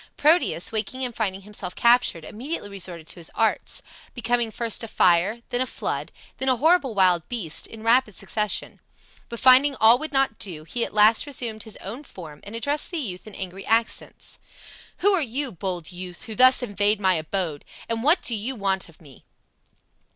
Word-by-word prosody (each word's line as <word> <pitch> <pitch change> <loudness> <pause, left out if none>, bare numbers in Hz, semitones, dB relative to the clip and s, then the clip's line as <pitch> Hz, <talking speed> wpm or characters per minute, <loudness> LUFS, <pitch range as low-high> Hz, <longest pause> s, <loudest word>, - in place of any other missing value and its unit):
Proteus, 305 - +2
waking 240 +4 -3
and 245 -2 -6
finding 195 -3 -2
himself 195 -3 -6
captured, 235 -9 +3
immediately 240 - -6
resorted 180 -4 -5
to 175 - -8
his 165 - -8
arts, 225 -1 0 0.3
becoming 240 -1 0
first 230 0 -3
a - - -5
fire, 190 +4 +3
then 245 - -1
a 260 - 0
flood, - - -4 0.3
then 265 - -1
a 255 - +4
horrible 290 -3 +2
wild 180 -4 +3
beast, 205 -11 -2
in 220 -1 -11
rapid 230 -2 +3
succession. 210 -1 -2 0.5
But 235 - -6
finding 265 +2 +6
all 230 +1 +6
would 310 +1 -5
not 270 -5 0
do, 165 -6 -4
he 230 +9 -2
at - - -4
last 215 +6 +5
resumed 235 -6 -5
his 220 0 -9
own 235 +9 -7
form 160 - -11
and 205 +3 -8
addressed 285 +6 -1
the 345 - -4
youth 205 - -5
in 215 - -11
angry 190 0 -7
accents: 225 +1 -2 0.6
"Who 405 +1 +4
are 375 - +3
you, 270 +1 -2
bold 180 -2 -5
youth, 180 0 -8
who 220 - -7
thus 255 +2 +7
invade 205 -1 +1
my 190 -2 +3
abode, 160 -2 -3 0.2
and 230 0 -2
what 305 +8 +4
do 240 - -1
yot 230 +4 -3
want 195 -3 -1
of 165 - -20
me?" 140 -5 -17
220 Hz, 190 wpm, -24 LUFS, 190-250 Hz, 0.6 s, thus